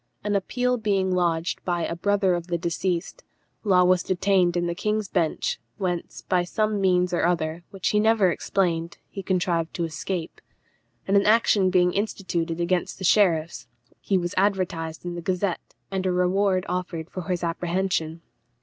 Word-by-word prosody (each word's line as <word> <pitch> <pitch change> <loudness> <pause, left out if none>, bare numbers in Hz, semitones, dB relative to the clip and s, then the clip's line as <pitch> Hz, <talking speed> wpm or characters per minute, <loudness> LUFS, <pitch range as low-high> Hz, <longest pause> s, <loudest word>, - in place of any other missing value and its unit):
An 205 0 0
appeal 250 +5 0
being 195 -4 0
lodged 170 -2 0
by 175 -2 -1
a 170 - -3
brother 195 +1 +2
of 175 -1 -3
the 175 -1 -1
deceased, 175 - -2 0.4
Law 185 -4 +4
was 180 0 +4
detained 185 -1 +2
in 175 - 0
the 170 - -1
King's 210 +3 -1
Bench, 185 - -1 0.2
whence, 180 -4 -3
by 180 -1 +1
some 215 +3 -1
means 180 -1 +2
or 175 - +1
other, 165 -1 0
which 195 -2 -2
he 210 - +2
never 215 -4 +4
explained, 170 -3 -1
he 195 - -5
contrived 175 -3 -1
to 170 - -1
escape; 165 +2 -4 0.7
and 195 - +2
an 200 0 +4
action 210 -3 +4
being 180 -1 +3
instituted 180 -5 -2
against 175 +1 0
the - - -8
sheriffs, 170 -5 +2 0.3
he 195 - +1
was 175 -1 -2
advertised 180 -5 0
in 175 - -3
the 175 - -5
Gazette, 180 +1 -2 0.2
and 190 -1 -1
a - - +2
reward 185 +1 +2
offered 175 -2 -3
for 185 -2 -6
his 180 -1 -1
apprehension. 170 -1 -1
180 Hz, 170 wpm, -25 LUFS, 170-195 Hz, 0.7 s, Law